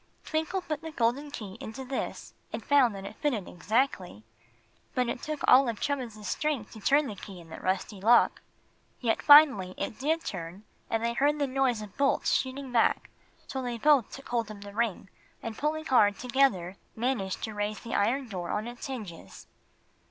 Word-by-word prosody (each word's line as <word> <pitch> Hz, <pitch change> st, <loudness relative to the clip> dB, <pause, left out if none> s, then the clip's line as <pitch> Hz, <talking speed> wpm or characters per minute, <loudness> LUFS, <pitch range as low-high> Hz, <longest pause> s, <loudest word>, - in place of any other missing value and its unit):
Twinkle 320 Hz, +4 st, -1 dB
put 305 Hz, -3 st, -4 dB
the 325 Hz, -, -6 dB
golden 275 Hz, +1 st, 0 dB
key 205 Hz, -8 st, -8 dB
into 240 Hz, +5 st, -7 dB
this 260 Hz, +1 st, -4 dB, 0.2 s
and -, -, -6 dB
found 265 Hz, -7 st, +4 dB
that 195 Hz, 0 st, -7 dB
it 205 Hz, -, -9 dB
fitted 245 Hz, -11 st, -1 dB
exactly. 185 Hz, -, -1 dB, 0.7 s
But 250 Hz, -1 st, +1 dB
it 240 Hz, -, -4 dB
took 305 Hz, -1 st, -4 dB
all 260 Hz, -1 st, +7 dB
of 225 Hz, -, -4 dB
Chubbins's 240 Hz, -7 st, -3 dB
strength 295 Hz, -8 st, -2 dB
to 220 Hz, -, -10 dB
turn 285 Hz, +8 st, +3 dB
the 230 Hz, -, -5 dB
key 195 Hz, -1 st, -10 dB
in 165 Hz, -1 st, -14 dB
the -, -, -8 dB
rusty 190 Hz, +1 st, -2 dB
lock. 235 Hz, +4 st, +4 dB, 0.6 s
Yet 230 Hz, -3 st, 0 dB
finally 275 Hz, -12 st, +7 dB
it -, -, -4 dB
did 320 Hz, +4 st, 0 dB
turn, 180 Hz, +1 st, -6 dB, 0.3 s
and 225 Hz, 0 st, 0 dB
they 235 Hz, -, 0 dB
heard 290 Hz, +5 st, +2 dB
the 290 Hz, -, +1 dB
noise 260 Hz, -4 st, 0 dB
of 205 Hz, -2 st, -12 dB
bolts 280 Hz, -1 st, +2 dB
shooting 265 Hz, 0 st, -1 dB
back, 235 Hz, -2 st, +2 dB, 0.3 s
so 265 Hz, -, -4 dB
they 245 Hz, -2 st, -3 dB
both 275 Hz, -2 st, +4 dB
took 275 Hz, -, -11 dB
hold 235 Hz, -3 st, -1 dB
of 210 Hz, -1 st, -9 dB
the 200 Hz, 0 st, -9 dB
ring, 225 Hz, -4 st, -1 dB, 0.4 s
and 225 Hz, -1 st, -4 dB
pulling 315 Hz, +4 st, -2 dB
hard 205 Hz, -8 st, +4 dB
together, 235 Hz, -8 st, +1 dB, 0.2 s
managed 225 Hz, -5 st, -2 dB
to 220 Hz, -, -3 dB
raise 205 Hz, 0 st, -3 dB
the 230 Hz, -, -7 dB
iron 250 Hz, +6 st, +1 dB
door 180 Hz, -5 st, -5 dB
on 215 Hz, +2 st, -2 dB
its 240 Hz, +2 st, -7 dB
hinges. 195 Hz, -, -8 dB
235 Hz, 190 wpm, -29 LUFS, 205-275 Hz, 0.7 s, all